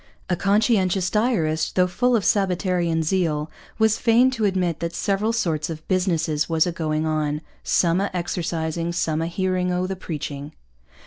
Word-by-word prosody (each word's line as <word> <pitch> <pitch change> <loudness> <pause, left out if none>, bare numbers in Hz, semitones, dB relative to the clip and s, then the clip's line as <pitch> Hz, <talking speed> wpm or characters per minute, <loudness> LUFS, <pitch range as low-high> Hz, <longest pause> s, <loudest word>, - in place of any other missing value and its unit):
A - - +3
conscientious 195 -2 +2
diarist, 185 -9 0
though 180 - +4
full 245 +8 +1
of 210 - 0
sabbatarian 180 -4 +1
zeal, 155 -3 0 0.3
was 220 -1 +3
fain 240 +3 +4
to 230 -4 -1
admit 180 -4 0
that 170 0 -4
'Severall 205 +3 0
sorts 165 -10 -1
of 160 -1 -7
Busnesses 165 -5 0
was 160 -1 +3
a 175 - -1
Going 155 -2 -1
on: 155 -1 -1 0.2
Sum 175 +1 +2
a 200 - 0
Exercising, 170 -1 -2
Sum 160 -2 0
a 165 - -1
Hearing 185 +1 -1
o' 180 +1 0
the 190 +1 -3
Preaching.' 150 -4 -6
175 Hz, 165 wpm, -23 LUFS, 160-195 Hz, 0.3 s, though